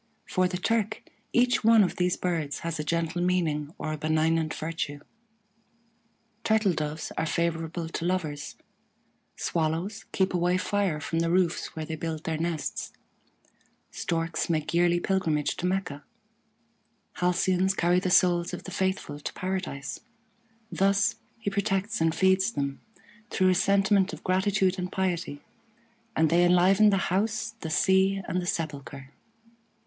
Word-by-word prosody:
For 185 Hz, -1 st, +1 dB
the 180 Hz, 0 st, -3 dB
Turk, 220 Hz, +2 st, -1 dB, 0.3 s
each 245 Hz, 0 st, +3 dB
one 225 Hz, -1 st, +7 dB
of 185 Hz, -, -2 dB
these 180 Hz, 0 st, +1 dB
birds 165 Hz, -5 st, -2 dB
has 165 Hz, -1 st, -3 dB
a -, -, -1 dB
gentle 170 Hz, +2 st, -1 dB
meaning, 160 Hz, -5 st, 0 dB
or 155 Hz, -, -3 dB
a -, -, -4 dB
benignant 155 Hz, +1 st, +1 dB
virtue: 155 Hz, -3 st, -4 dB, 1.4 s
Turtle 220 Hz, -4 st, +3 dB
doves 155 Hz, 0 st, -4 dB
are 160 Hz, -, 0 dB
favorable 165 Hz, 0 st, -1 dB
to 165 Hz, 0 st, -4 dB
lovers, 160 Hz, -6 st, -2 dB, 0.8 s
Swallows 170 Hz, +6 st, -2 dB
keep 190 Hz, 0 st, +1 dB
away 180 Hz, +1 st, +2 dB
fire 190 Hz, -4 st, 0 dB
from 165 Hz, +2 st, -2 dB
the 165 Hz, 0 st, +1 dB
roofs 175 Hz, -1 st, 0 dB
where 160 Hz, -1 st, -4 dB
they 160 Hz, -, -5 dB
build 160 Hz, 0 st, -4 dB
their 160 Hz, -1 st, -2 dB
nests, 165 Hz, -2 st, -3 dB, 1.0 s
Storks 165 Hz, 0 st, -2 dB
make 155 Hz, -2 st, -1 dB
yearly 175 Hz, 0 st, +3 dB
pilgrimage 165 Hz, -6 st, 0 dB
to 180 Hz, -, -1 dB
Mecca, 180 Hz, -7 st, -2 dB, 1.1 s
Halcyons 185 Hz, +1 st, +2 dB
carry 175 Hz, 0 st, +3 dB
the 185 Hz, -, -1 dB
souls 175 Hz, -2 st, +3 dB
of -, -, -10 dB
the 190 Hz, -, -8 dB
faithful 190 Hz, -5 st, -2 dB
to -, -, -5 dB
Paradise. 185 Hz, -7 st, -4 dB, 0.7 s
Thus 195 Hz, +1 st, +2 dB, 0.2 s
he 215 Hz, -3 st, -3 dB
protects 200 Hz, 0 st, -1 dB
and 165 Hz, 0 st, +2 dB
feeds 190 Hz, +5 st, +3 dB
them, 140 Hz, -1 st, -3 dB, 0.5 s
through 185 Hz, 0 st, +2 dB
a -, -, +5 dB
sentiment 195 Hz, +1 st, +3 dB
of -, -, -9 dB
gratitude 190 Hz, 0 st, +1 dB
and 180 Hz, 0 st, -3 dB
piety; 175 Hz, -6 st, -2 dB, 0.7 s
and 160 Hz, -1 st, +3 dB
they 175 Hz, +1 st, +5 dB
enliven 185 Hz, +4 st, +5 dB
the 195 Hz, -, +3 dB, 0.2 s
house, 220 Hz, +3 st, 0 dB
the 160 Hz, -, -5 dB
sea, 190 Hz, +3 st, +3 dB
and 180 Hz, -, -1 dB
the 175 Hz, -, -5 dB
sepulchre. 140 Hz, -4 st, -4 dB
175 Hz, 145 wpm, -27 LUFS, 160-190 Hz, 1.4 s, one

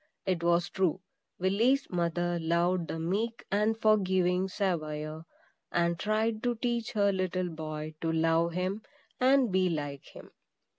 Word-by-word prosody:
It 185 Hz, -3 st, 0 dB
was 170 Hz, +1 st, +2 dB
true, 190 Hz, -1 st, 0 dB, 0.4 s
Willy's 225 Hz, +9 st, +2 dB
mother 175 Hz, 0 st, 0 dB
loved 170 Hz, +1 st, +1 dB
the -, -, -4 dB
meek 205 Hz, +8 st, -2 dB
and 215 Hz, +2 st, +1 dB
forgiving 190 Hz, -4 st, +2 dB
Saviour, 160 Hz, -5 st, -3 dB, 0.4 s
and 170 Hz, 0 st, +1 dB
tried 215 Hz, +1 st, 0 dB
to 245 Hz, -1 st, 0 dB
teach 235 Hz, 0 st, -2 dB
her 200 Hz, -1 st, +3 dB
little 185 Hz, -1 st, -1 dB
boy 155 Hz, -1 st, -6 dB
to 165 Hz, -, 0 dB
love 165 Hz, +1 st, +2 dB
him 185 Hz, +4 st, -2 dB, 0.4 s
and 260 Hz, -3 st, +4 dB
be 185 Hz, 0 st, +2 dB
like 145 Hz, -4 st, -4 dB
him. -, -, -13 dB
180 Hz, 140 wpm, -30 LUFS, 165-210 Hz, 0.4 s, and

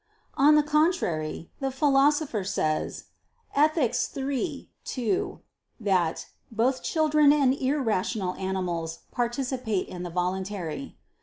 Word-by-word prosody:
On 295 Hz, +2 st, +5 dB
the 300 Hz, -, +5 dB
contrary, 295 Hz, -, 0 dB
The 270 Hz, -, -1 dB
Philosopher 275 Hz, -3 st, +2 dB
says 155 Hz, -5 st, -1 dB, 0.5 s
(Ethic. 300 Hz, -3 st, +3 dB, 0.2 s
iii, 275 Hz, +2 st, -2 dB, 0.2 s
2) 370 Hz, -, -2 dB, 0.4 s
that 185 Hz, -6 st, +1 dB, 0.3 s
"both 245 Hz, +4 st, +1 dB
children 305 Hz, -2 st, +4 dB
and 280 Hz, -3 st, +4 dB
irrational 225 Hz, -8 st, 0 dB
animals 180 Hz, -4 st, -3 dB
participate 245 Hz, -4 st, -1 dB
in 180 Hz, -, -7 dB
the 175 Hz, -, -4 dB
voluntary." 185 Hz, -, -3 dB
250 Hz, 100 wpm, -27 LUFS, 185-290 Hz, 0.5 s, On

